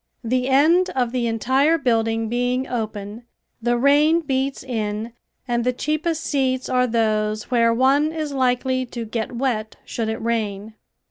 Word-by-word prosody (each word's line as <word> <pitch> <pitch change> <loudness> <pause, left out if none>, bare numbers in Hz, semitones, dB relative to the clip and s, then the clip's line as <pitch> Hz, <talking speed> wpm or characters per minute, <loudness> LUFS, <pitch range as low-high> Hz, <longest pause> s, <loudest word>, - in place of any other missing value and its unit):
The 250 +2 0
end 320 +7 +4
of 245 -3 0
the 245 -2 -1
entire 260 +8 +2
building 225 -4 0
being 245 +3 -1
open, 215 -2 -5 0.4
the 240 +1 +1
rain 295 +6 +4
beats 270 -2 -2
in 220 -2 -3 0.3
and 240 -1 0
the 250 - +2
cheapest 310 +4 -2
seats 260 -2 0
are 250 0 +2
those 215 -1 0
where 230 -2 +4
one 270 +6 +3
is 310 -3 -4
likely 255 0 +1
to 235 -1 -6
get 220 0 -3
wet 235 -3 -2
should 225 -2 -3
it 220 - -2
rain. 220 -2 -2
245 Hz, 150 wpm, -22 LUFS, 225-270 Hz, 0.4 s, end